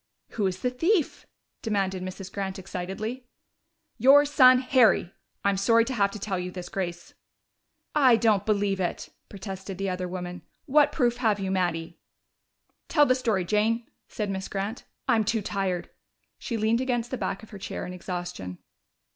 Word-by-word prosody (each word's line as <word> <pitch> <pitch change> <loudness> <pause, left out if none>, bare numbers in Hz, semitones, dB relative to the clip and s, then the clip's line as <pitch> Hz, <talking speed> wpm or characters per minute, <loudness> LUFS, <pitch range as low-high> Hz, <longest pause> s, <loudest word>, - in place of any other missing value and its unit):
"Who 210 - -2
was 185 -1 -2
the 250 - 0
thief?" 330 +6 0 0.3
demanded 195 -4 -1
Mrs. 185 +1 -7
Grant 195 -1 -3
excitedly. 195 +7 -5 0.7
"Your 275 +5 +7
son 255 -3 +7
Harry! 255 -8 +3 0.3
I'm 200 -1 +3
sorry 230 +4 +4
to 260 - -3
have 200 -4 +2
to 200 - -7
tell 195 -2 -3
you 180 0 -4
this, 180 -1 -7
Grace." 175 -3 -5 0.8
"I 265 -5 +6
don't 220 -4 +3
believe 205 -2 +1
it!" 180 -2 -3 0.2
protested 195 -1 -7
the 195 0 -2
other 180 0 -3
woman. 180 0 -6 0.2
"What 295 0 +4
proof 240 -5 +1
have 220 -4 +1
you, 190 -1 -2
Mattie?" 170 -3 -1 0.9
"Tell 295 -2 +5
the 255 - +4
story, 225 -8 0
Jane," 220 +4 +1 0.2
said 210 -2 -3
Miss 190 0 -4
Grant. 200 +4 -4 0.2
"I'm 225 -1 +3
too 220 0 0
tired." 190 -3 -2 0.5
She 230 - -3
leaned 220 +3 +2
against 240 -2 -1
the - - -1
back 195 - -3
of 220 - -14
her 205 - -9
chair - - -5
in 180 - -6
exhaustion. 175 - -5
200 Hz, 165 wpm, -27 LUFS, 185-235 Hz, 0.9 s, Your